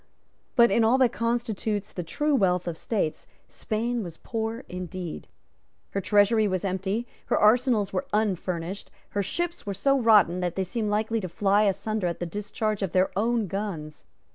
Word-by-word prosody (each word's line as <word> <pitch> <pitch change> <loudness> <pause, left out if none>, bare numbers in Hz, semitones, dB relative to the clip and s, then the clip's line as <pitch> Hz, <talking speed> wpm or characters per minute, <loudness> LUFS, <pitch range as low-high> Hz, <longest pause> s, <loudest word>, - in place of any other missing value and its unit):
But, 235 -2 +6
in 230 - +4
all 230 +4 +4
that 255 -3 +4
constitutes 225 -3 -2
the 180 - -3
true 295 - -1
wealth 180 -8 +2
of 170 - -2
states, 175 -3 -2 0.2
Spain 235 +2 -2
was 170 -3 -8
poor 225 +2 -4
indeed. 180 -2 -6 0.6
Her 195 - -1
treasury 210 +2 +4
was 185 -1 -1
empty; 195 +4 -1 0.2
her - - +2
arsenals 215 -2 +3
were 185 - -2
unfurnished; 190 -3 -1 0.2
her 205 - -1
ships 345 - -3
were 200 - -2
so 275 +6 +2
rotten 210 -7 +5
that 180 -1 -2
they 190 - 0
seemed 215 +3 -2
likely 220 +2 0
to 185 - -4
fly 205 +4 +2
asunder 210 0 0
at 170 - -3
the 175 - -2
discharge 210 +3 -3
of 195 -4 -2
their 185 0 +3
own 225 +2 +1
guns. 175 -6 -5
205 Hz, 170 wpm, -26 LUFS, 185-230 Hz, 0.6 s, But